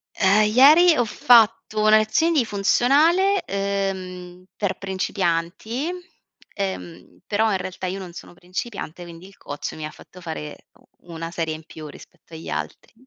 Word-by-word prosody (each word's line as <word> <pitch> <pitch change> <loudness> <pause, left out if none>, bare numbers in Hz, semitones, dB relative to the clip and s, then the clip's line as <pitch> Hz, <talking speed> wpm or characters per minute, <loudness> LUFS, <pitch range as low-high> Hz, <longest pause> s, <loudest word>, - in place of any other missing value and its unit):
Ehm, 200 +2 +4
ieri 310 +6 +7
ho 245 - +2
fatto 225 -1 +3
una 215 0 +6
lezione 270 +11 +1
di 290 -7 +2
funzionale, 300 - +3
ehm, 190 -2 -4
per 195 -2 -2
principianti, 190 - -2 0.6
ehm, 190 -4 -6
però 220 +1 +1
in 195 - +1
realtà 185 0 -6
io 190 +2 -3
non 180 -3 -9
sono 175 - -11
principiante, 180 - -7
quindi 170 +1 -12
il 195 - -17
coach 145 0 -6
mi 155 - -8
ha - - -6
fatto 180 - -16
fare 160 -3 -8
u 170 - -19
una 165 0 -6
serie 165 -2 -3
in 155 0 -11
più 155 -1 -10
rispetto 160 +2 -15
agli 160 - -9
altri. - - -6
195 Hz, 155 wpm, -22 LUFS, 175-225 Hz, 0.6 s, ieri